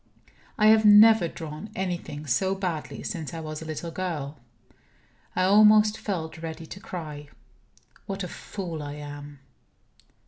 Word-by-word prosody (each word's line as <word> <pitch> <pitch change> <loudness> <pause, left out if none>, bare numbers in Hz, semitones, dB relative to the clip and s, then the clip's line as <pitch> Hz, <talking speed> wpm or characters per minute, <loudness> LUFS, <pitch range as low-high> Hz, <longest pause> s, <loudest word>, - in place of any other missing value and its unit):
I 215 - +3
have 220 0 +6
never 210 -2 +7
drawn 160 +5 -8
anything 175 -5 -4
so 190 +9 +1
badly 180 -5 -4
since 165 -3 -5
I - - -4
was 155 -1 -6
a - - -7
little 160 +2 -5
girl; 155 -5 -4 1.0
I - - +2
almost 210 +2 +6
felt 165 -5 -4
ready 165 0 -6
to 190 - -9
cry. 150 -6 -7 0.8
What 195 -1 -4
a - - -3
fool 175 -3 -6
I 145 -1 -6
am! 145 -1 -9
165 Hz, 140 wpm, -26 LUFS, 150-195 Hz, 1.0 s, never